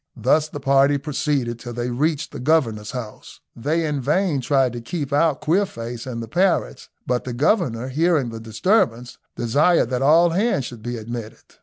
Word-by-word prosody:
Thus 150 +7 +2
the 145 - -7
party 140 +1 +3
proceeded 140 -4 -2
till 120 0 -7
they 120 +1 -3
reached 150 +4 -1
the - - -7
governor's 120 -7 +1
house. 120 -5 -8 0.2
They 155 +7 -1
in 145 -3 -2
vain 150 +1 +1
tried 130 -1 +2
to 120 - -6
keep 140 +3 -4
out 150 0 +2
Queerface 130 - -2
and 115 -2 -4
the - - -8
parrots, 185 - 0 0.2
but 125 0 -1
the 125 - -5
governor, 130 - +1
hearing 155 -2 +1
the 115 0 -7
disturbance, 120 - 0 0.2
desired 140 +3 +2
that 125 0 -1
all 165 +5 +5
hands 190 - +1
should 120 -3 -9
be 120 +2 -4
admitted. 115 0 -7
135 Hz, 175 wpm, -22 LUFS, 120-155 Hz, 0.2 s, all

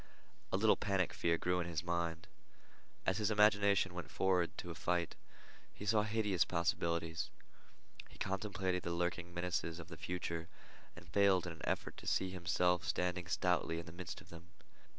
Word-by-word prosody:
A - - +2
little 110 +2 +5
panic 95 -4 +1
fear 85 -2 +2
grew 90 +1 +1
in 85 - -1
his 80 -1 -2
mind. 85 -1 -1 0.8
As 95 +1 +2
his 105 -1 +2
imagination 100 -3 +4
went 90 -1 -6
forward 90 -3 +1
to 85 - -5
a - - -4
fight, 85 0 0 0.6
he 105 - -9
saw 105 0 +4
hideous 105 -4 +2
possibilities. 85 -2 0 0.8
He - - -15
contemplated 95 -2 -1
the 85 - -2
lurking 85 0 -1
menaces 85 -1 -2
of 85 - -9
the 80 - -8
future, 85 -2 -3 0.5
and 85 -1 -12
failed 95 -1 +4
in 90 - -4
an 80 - -13
effort - - -2
to - - -9
see 95 -1 +1
himself 90 0 +2
standing 90 0 -1
stoutly 90 -3 +1
in 85 - -5
the - - -9
midst 85 +1 -6
of - - -17
them. 85 0 -11
90 Hz, 170 wpm, -37 LUFS, 85-95 Hz, 0.8 s, little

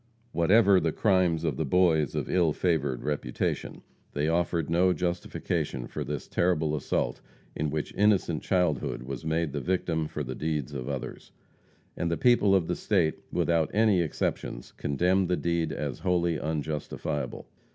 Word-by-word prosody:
Whatever 95 +3 +5
the 80 -2 0
crimes 90 -5 +2
of 80 -6 -1
the 80 - 0
boys 80 -2 +2
of - - -2
ill 85 -4 +2
favored 75 -8 0
reputation, 75 -5 -3 0.3
they 70 +1 0
afforded 85 -1 0
no 90 +2 +3
justification 85 -7 -2
for - - -5
this - - -5
terrible 80 -4 +1
assault 70 - -1 0.3
in 75 0 -1
which 75 0 -3
innocent 100 -6 +2
childhood 90 -10 0
was 65 -1 -6
made 80 -1 0
the 70 - -2
victim 80 -1 -1
for 75 - -4
the 65 -1 -5
deeds 75 -2 -3
of 65 -1 -5
others. 70 -3 -6 0.6
And 85 - -1
the 85 - 0
people 120 -6 +4
of 90 -4 +2
the - - -1
state, 90 -7 +1
without 85 -2 +1
any 105 -4 +4
exceptions, 75 -6 -3
condemned 90 +6 +1
the 90 - +2
deed 85 -2 0
as 70 -4 -4
wholly 85 -4 +1
unjustifiable. 75 -2 -3
80 Hz, 155 wpm, -28 LUFS, 75-90 Hz, 0.6 s, Whatever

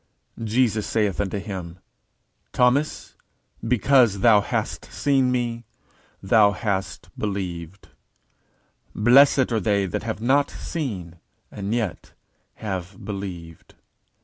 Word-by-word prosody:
_Jesus 115 -1 +1
saith 105 -6 0
unto 100 0 -2
him, 95 -4 -6 0.8
Thomas, 130 +5 +1 0.5
because 120 -3 +3
thou 110 -2 +6
hast - - -3
seen 135 -3 +1
me, 120 -2 -2 0.6
thou 105 +1 +5
hast 100 -3 -3
believed: 95 -3 -5 1.1
blessed 130 +3 +5
are 115 - +1
they 100 0 +1
that 90 - -3
have 110 -1 -4
not 135 +5 +2
seen, 95 - -5 0.3
and 100 0 -5
yet 110 -6 -3 0.4
have 95 -2 -6
believed. 90 -5 -7
105 Hz, 100 wpm, -23 LUFS, 95-120 Hz, 1.1 s, thou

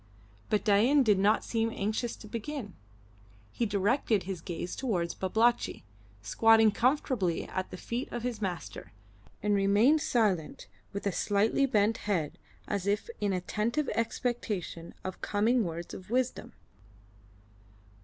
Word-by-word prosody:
But 210 - +1
Dain 235 +8 +5
did 210 -5 +3
not 210 +3 +3
seem 225 -1 0
anxious 220 +2 -2
to 215 - -12
begin. 230 -1 -5 0.8
He 235 - -1
directed 205 +1 +1
his 185 -2 -5
gaze 175 0 -5
towards 180 -10 -1
Babalatchi, 225 +6 +1 0.4
squatting 225 - +5
comfortably 240 - +1
at 185 0 -4
the 185 - -8
feet 240 +8 -4
of 240 - -4
his 240 -3 -3
master, 180 - -5 0.5
and 210 0 +2
remained 205 +10 +4
silent 205 - 0 0.3
with 200 - -5
a 200 - +2
slightly 215 +9 +2
bent 220 -1 +2
head 160 -7 -1 0.3
as 200 -1 -2
if 205 - 0
in 205 -1 0
attentive 215 +10 -1
expectation 220 -7 -3
of 185 0 -6
coming 225 +4 +2
words 170 -1 -5
of 185 - -9
wisdom. 255 +1 -1
210 Hz, 135 wpm, -30 LUFS, 190-235 Hz, 0.8 s, Dain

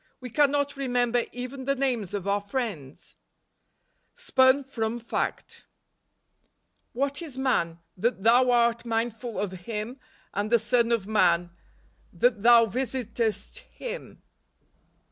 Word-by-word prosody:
We 250 -2 -8
cannot 285 +2 +2
remember 245 -3 +1
even 255 +2 -6
the 275 +1 +1
names 245 -8 -1
of 200 -1 -4
our 200 +1 +1
friends! 200 - -5 0.5
" - - -46
Spun 260 +2 +5
from 235 -3 -3
Faet. 235 - -4 0.6
" - - -46
ir/irtf 280 +4 -1
is 295 -6 -8
man, 170 -11 0 0.2
that 200 0 -1
thou 245 +3 +5
art 235 -1 +3
mindful 230 0 -3
of 205 -2 -2
himf 210 +7 -6 0.3
and 205 +2 -2
the 235 - +6
son 235 +1 +1
of 230 -5 +1
man, 175 -5 +2 0.6
that 220 +4 +1
thou 235 +1 +7
visitest 230 - -2
him?" - - -9
235 Hz, 125 wpm, -27 LUFS, 210-260 Hz, 0.6 s, thou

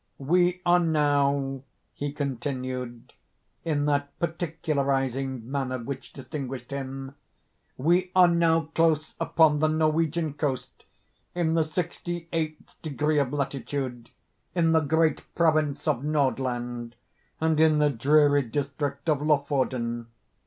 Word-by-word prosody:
"We 175 +5 +2
are 175 0 +5
now," 140 -4 +1 0.3
he 145 0 -4
continued, 130 -3 -4 0.5
in 150 -3 0
that 145 -1 -1
particularizing 140 -6 -1
manner 135 -2 -1
which 130 +1 -7
distinguished 135 -3 -6
him—"we 140 +5 -3
are 180 -1 +8
now 165 -1 +3
close 155 -2 +2
upon 155 -2 +3
the 155 - +3
Norwegian 155 0 +1
coast—in 155 +4 -4
the 165 -1 +3
sixty 175 +1 -4
eighth 155 -2 -4
degree 150 0 0
of 135 -3 0
latitude—in 140 +3 -3
the 160 - +5
great 160 +1 +1
province 155 -4 +1
of 125 - +1
Nordland—and 130 +1 -2
in 155 -1 +5
the 150 -1 +3
dreary 145 +3 +4
district 140 +3 -3
of 150 -3 +2
Lofoden. 130 -6 0
145 Hz, 105 wpm, -26 LUFS, 135-160 Hz, 0.5 s, are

